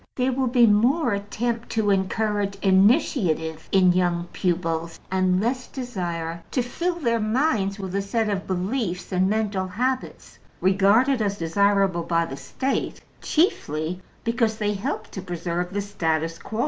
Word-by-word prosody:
There 255 0 +1
will 260 0 0
be 240 -1 +5
more 240 +5 +3
attempt 230 +4 -3
to 215 -2 +2
encourage 200 +1 0
initiative 190 - +2
young 180 -2 +3
pupils, 165 -2 -1
and 185 -1 +2
less 245 +4 -1
desire 170 -10 -4
to 250 - 0
fill 340 +8 -2
their 235 -9 0
minds 215 -3 +1
with 190 -2 -6
a 200 - +1
set 220 +3 -1
of 200 -2 -2
beliefs 185 0 -2
and 185 0 +2
mental 205 -3 0
habits 255 +7 -3 0.2
regarded 205 +7 +3
as 200 -1 0
desirable 195 +1 +2
by 170 0 +1
the 135 - -6
State, 265 - -3 0.2
chiefly 175 - 0 0.2
because 230 -1 0
they 210 -1 0
help 200 0 -4
to 190 - -6
preserve 175 0 -3
the 205 +1 -1
status 165 -5 -2
quo. 220 - -6
200 Hz, 145 wpm, -24 LUFS, 180-230 Hz, 0.2 s, be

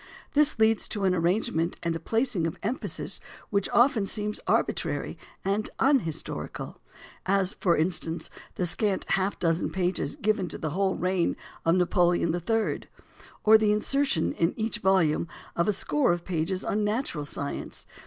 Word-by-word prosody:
This 300 +1 +3
leads 220 0 +3
to 205 - -2
an 190 -1 +3
arrangement 170 -1 0
and 170 -1 0
a - - -3
placing 225 - 0
of 165 - -5
emphasis 230 +6 -2 0.3
which 200 -1 +1
often 240 -5 +4
seems 210 +1 -2
arbitrary - - 0 0.3
and 200 +2 0
unhistorical, 260 - -1 0.5
as, 195 +1 +2
for 175 -5 +3
instance, 165 0 -1 0.2
the 180 - 0
scant 195 +3 0
half 195 +1 +1
dozen 165 0 +1
pages 185 0 -1
given 210 -3 0
to - - -6
the 155 - -3
whole 190 +3 +1
reign 180 -1 0 0.3
of 165 +1 +4
Napoleon 175 -2 +2
III, 220 +6 0 0.6
or 220 +1 +7
the 215 -1 +3
insertion 215 - +1
in 165 +1 0
each 220 0 0
volume 185 -5 +2 0.3
of 170 - +1
a - - +4
score 270 +6 +1
of 175 0 -2
pages 185 +1 -2
on 210 +1 0
natural 210 - -1
science. 145 -1 -5
190 Hz, 155 wpm, -27 LUFS, 170-215 Hz, 0.6 s, or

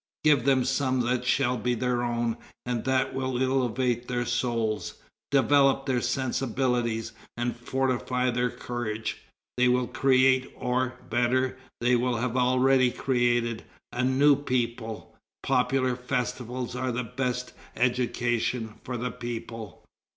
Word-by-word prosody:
Give 145 -5 +4
them 130 -2 +3
some 130 -1 +1
that 125 +1 0
shall 125 0 +2
be 125 +2 0
their 125 0 0
own, 120 -1 -1 0.3
and 120 -2 -2
that 130 -1 +1
will 130 -1 -2
elevate 125 -2 0
their 120 -1 -1
souls, 115 -3 -1 0.3
develop 135 0 +4
their 130 -3 +1
sensibilities, 125 -2 -1 0.3
and 120 0 -1
fortify 125 0 0
their 125 +1 +1
courage. 120 -3 -4 0.4
They 125 0 +4
will 125 0 +3
create, 130 0 +3
or, 125 +1 -1
better, 125 +2 +1 0.3
they 120 +1 +2
have 125 0 -1
already 130 +1 +4
created, 120 -2 0 0.3
a 125 - 0
new 140 +3 +5
people. 120 -5 -3 0.3
Popular 130 -1 +2
festivals 125 -1 -3
are 130 0 -1
the 125 +1 -2
best 125 +1 -3 0.2
education 120 -2 0
for 125 -1 -4
the 125 +1 -3
people." 115 -4 -7
125 Hz, 125 wpm, -27 LUFS, 120-130 Hz, 0.4 s, new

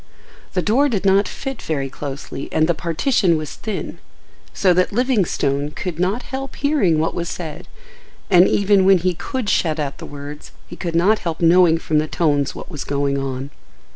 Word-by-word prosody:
The - - 0
door 270 +7 +3
did 205 -5 -2
not 195 +1 +4
fit 270 -3 -6
very 140 -4 -2
closely 140 0 -7
and 155 - +3
the 170 - +3
partition 170 - +1
was 155 -2 -5
thin, 215 -3 -5 0.5
so 185 -2 +3
that 180 +1 +2
Livingstone 195 - 0
could 170 +2 -5
not 195 +7 0
help 270 0 -6
hearing 280 - +2
what 160 +1 0
was 170 -1 -3
said, 160 -4 -7 0.6
and 180 -1 +6
even 200 -1 +3
when 190 0 +6
he 180 +1 0
could 250 - -4
shut 160 -5 +1
out 140 -2 -3
the - - -8
words 145 +1 -9
he - - -10
could 170 -2 -4
not 200 +6 +3
help 165 -3 -4
knowing 170 0 +5
from 155 -2 0
the 155 - -1
tones 145 -4 0
what - - -9
was 150 -4 -5
going 140 -1 -1
on. 135 +1 -4
170 Hz, 185 wpm, -20 LUFS, 150-200 Hz, 0.6 s, and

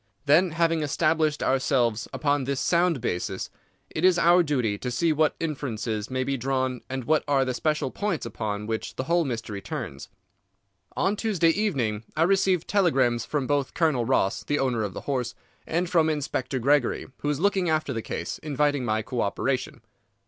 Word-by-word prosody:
Then, 160 +4 +4
having 165 -1 +2
established 155 +1 +1
ourselves 125 -4 +1
upon 145 -3 0
this 140 0 -1
sound 170 -5 +2
basis, 90 -3 -3 0.4
it 155 - -3
is 185 -1 +5
our 170 +1 +5
duty 130 -10 0
to 125 - -3
see 155 +7 +1
what 155 0 +2
inferences 120 -8 -3
may 130 0 -1
be 135 +1 -1
drawn 130 0 -1
and 130 -1 -3
what 155 +5 +2
are 140 -2 +3
the 130 - -1
special 150 0 -1
points 205 -6 -2
upon 105 -1 -4
which 110 0 -4
the - - -2
whole 170 +4 +2
mystery 115 -5 -4
turns. - - -6 0.9
On 200 - +2
Tuesday 200 -6 +2
evening 135 - -1
I 160 - +4
received 190 -1 +2
telegrams 135 - +2
from 145 -3 -1
both 145 -1 -1
Colonel 155 -8 +2
Ross, 95 -3 +1
the 145 - 0
owner 125 -5 0
of 100 -3 -3
the - - -5
horse, 125 -4 -2 0.3
and 175 +3 0
from 165 -2 +3
Inspector 140 -3 -2
Gregory, 135 +1 +2
who 145 - -2
is 150 -1 -1
looking 195 -1 +2
after 155 -3 0
the 115 - -3
case, - - -5
inviting 145 -2 0
my 110 -2 0
co 120 +1 -3
operation." 130 +5 -2
145 Hz, 180 wpm, -26 LUFS, 125-165 Hz, 0.9 s, is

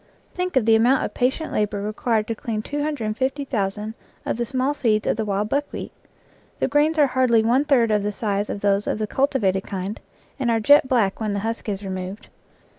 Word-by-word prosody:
Think 360 -2 -3
of 255 -4 +3
the 225 - +5
amount 245 +4 +3
of - - -6
patient 265 +6 -1
labor 210 -1 0
required 215 +1 -1
to 230 - -2
clean 215 -1 -4
250,000 255 -6 -2 0.3
of - - -1
the 240 - -1
small 260 +3 0
seeds 220 -7 +1
of - - +1
the 220 0 -2
wild 205 0 -1
buck 285 +3 -1
wheat! - - -6 0.7
The - - 0
grains 295 +3 +2
are 295 - +6
hardly 255 -4 +3
one 250 +6 +2
third 245 -6 +3
the 210 0 +1
size 205 -1 -2
of 200 - -4
those 200 0 +1
of - - 0
the 215 - -1
cultivated 210 -6 +1
kind 195 +2 -5 0.4
and 250 -3 0
are 230 -1 +2
jet 285 +5 +6
black 230 -7 +1
when 215 -2 -1
the 200 - -2
husk 225 0 -3
is 200 0 -4
removed. 190 +1 -6
225 Hz, 200 wpm, -23 LUFS, 210-265 Hz, 0.7 s, are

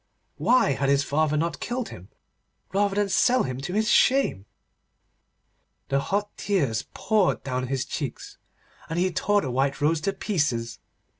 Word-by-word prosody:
Why 225 - +3
had 135 0 0
his 140 0 +3
father 150 +1 +1
not 160 -1 -1
killed 245 0 -3
him, 90 +2 -11 0.6
rather 200 0 +1
than 205 0 +1
sell 245 +5 +3
him 130 0 -4
to 180 +6 -5
his 215 +2 +1
shame? 250 - +3 1.4
The 140 - +2
hot 205 +7 -2
tears 140 - 0
poured 215 -4 +1
down 130 -1 -2
his 135 0 -2
cheeks, 140 -2 -6 0.5
and 160 - -3
he 185 +1 +1
tore 205 +3 +1
the 130 - -3
white 135 +2 0
rose 150 +2 +1
to 195 +4 -1
pieces. 145 - -1
155 Hz, 155 wpm, -25 LUFS, 135-205 Hz, 1.4 s, Why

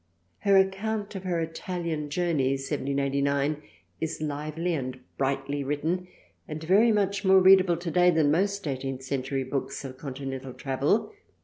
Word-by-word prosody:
Her 200 -1 +4
account 205 +2 0
of 190 -1 -7
her 175 -2 0
Italian 165 -2 -3
Journey 150 -5 +1
(1789) 140 +2 0 0.4
is 160 - -3
lively 155 +3 -2
and 130 -4 -3 0.2
brightly 135 +1 -1
w^ritten 160 +6 -1 0.4
and 155 +1 -6
very 205 +8 +5
much 200 -1 +1
more 190 0 +6
readable 185 -2 +6
today 175 +1 +3
than 160 -4 +3
most 200 +2 0
eighteenth 135 -1 -3
century 135 0 -2
books 135 +1 -4
of 130 0 -8
Continental 135 -1 -6
Travel. 140 - 0
155 Hz, 135 wpm, -27 LUFS, 135-185 Hz, 0.4 s, more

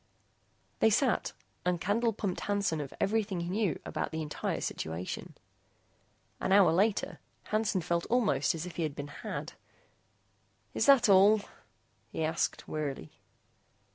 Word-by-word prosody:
They 220 - +5
sat 230 +1 +1 0.3
and 180 -1 0
Candle 225 +6 +1
pumped 200 -3 -3
Hansen 200 -6 -1
of 140 - -6
everything 200 -3 0
he 170 - -4
knew 195 -4 0
about - - -3
the 160 0 -3
entire 150 - -3
situation. 80 +3 -5 1.0
An - - -1
hour 195 -4 +6
later, 200 +5 +1 0.2
Hansen 215 -3 0
felt 170 0 -1
almost 205 - +2
as 165 +1 -4
if 180 -2 -9
he - - -1
had 155 -3 -2
been 145 0 -6
had. - - -6 1.2
"Is - - +1
that 270 -4 +7
all?" 200 +2 +6 0.7
he 160 - -2
asked, 160 +1 -1
wearily. 140 - -4
185 Hz, 140 wpm, -30 LUFS, 160-210 Hz, 1.2 s, that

